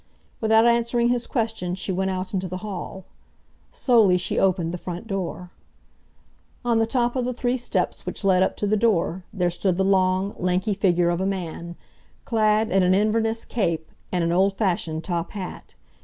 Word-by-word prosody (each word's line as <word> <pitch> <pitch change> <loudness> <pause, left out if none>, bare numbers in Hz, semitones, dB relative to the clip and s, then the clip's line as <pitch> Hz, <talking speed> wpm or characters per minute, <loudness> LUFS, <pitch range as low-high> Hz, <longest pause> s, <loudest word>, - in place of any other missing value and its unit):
Without 220 0 +4
answering 235 0 +2
his 245 -1 0
question 220 -7 -2
she 190 +1 -3
went 190 +1 0
out 185 0 -4
into 190 -1 -1
the 185 +3 -6
hall. 190 -1 -6 0.7
Slowly 220 -8 +4
she 175 - -1
opened 185 -3 +1
the 180 - -4
front 175 +3 -6
door. 185 -3 -4 1.1
On 235 -2 +3
the 225 - +2
top 240 0 0
of 255 - 0
the 250 0 -2
three 245 +1 0
steps 245 - -2
which - - -5
led 185 -2 +4
up 190 - +1
to - - -1
the 210 +1 +2
door, 190 -5 +1
there 180 -4 0
stood 180 +1 0
the 190 - +2
long, 190 0 +2
lanky 185 +4 0
figure 175 -3 +2
of 175 +1 -1
a 190 - 0
man, 170 -3 -4 0.5
clad 215 -1 +2
in 195 +1 +4
an 185 +1 +4
Inverness 225 +2 +1
cape 170 -8 -2 0.2
and 180 -2 0
an 170 - +1
old 195 +2 +2
fashioned 170 -6 -1
top 170 -2 -3
hat. 195 -3 -7
190 Hz, 185 wpm, -24 LUFS, 180-225 Hz, 1.1 s, Without